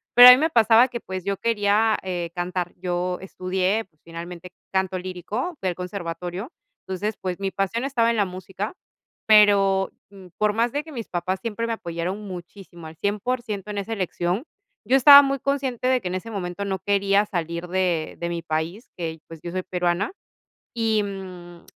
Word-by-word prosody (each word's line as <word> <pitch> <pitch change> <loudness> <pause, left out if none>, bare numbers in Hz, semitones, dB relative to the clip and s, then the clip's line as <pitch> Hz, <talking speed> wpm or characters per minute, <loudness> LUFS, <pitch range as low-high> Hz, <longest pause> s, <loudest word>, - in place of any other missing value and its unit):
Pero 245 0 +12
a - - +14
mí 250 - +8
me 320 +3 +1
pasaba 230 +2 +6
que, 240 -2 -5
pues, 185 -3 -6
yo 200 -1 -1
quería, 215 -1 +2
eh, 175 -2 -3
cantar. 175 0 -3
Yo 180 0 -2
estudié, 190 +2 -1 0.2
finalmente, 170 +1 -8 0.2
canto 190 -1 0
lírico 200 - -4
del 185 -1 +1
conservatorio, 180 - -5 0.4
entonces 200 +3 -2
pues 185 -1 -3
mi 195 -1 -1
pasión 195 +6 -2
estaba 235 -4 +2
en 230 - -1
la 205 - +3
música, 190 +2 -6 0.5
pero 200 -3 +5 0.2
mm, 195 -2 -13
por 210 0 +2
más 230 +2 +1
de 290 +1 -1
que 320 - -12
mis 235 -6 -6
papás 185 +2 -2
siempre 230 0 -3
me - - -2
apoyaron 175 0 -4
muchísimo 175 -2 -10
al 160 - -11
100% 210 0 -2
en 205 - -5
esa 200 +3 -4
elección, 185 +1 -1 0.4
yo 265 - +3
estaba 280 +2 +10
muy 275 0 -1
consciente 265 -3 -1
de 255 -1 +3
que 180 - -3
en 185 - -3
ese 185 +5 -5
momento 185 -1 -4
no 190 -1 -2
quería 200 +1 +2
salir 170 -2 -4
de 175 -3 -1
de 170 - -2
mi 170 -1 -3
país, 165 +7 -3
que, 165 -2 -4
pues, 165 -2 -11
yo 170 - -6
soy 185 +1 -3
peruana, 180 +2 -1 0.6
y 225 -3 +1
mm, 180 -3 -8
190 Hz, 180 wpm, -24 LUFS, 180-220 Hz, 0.6 s, a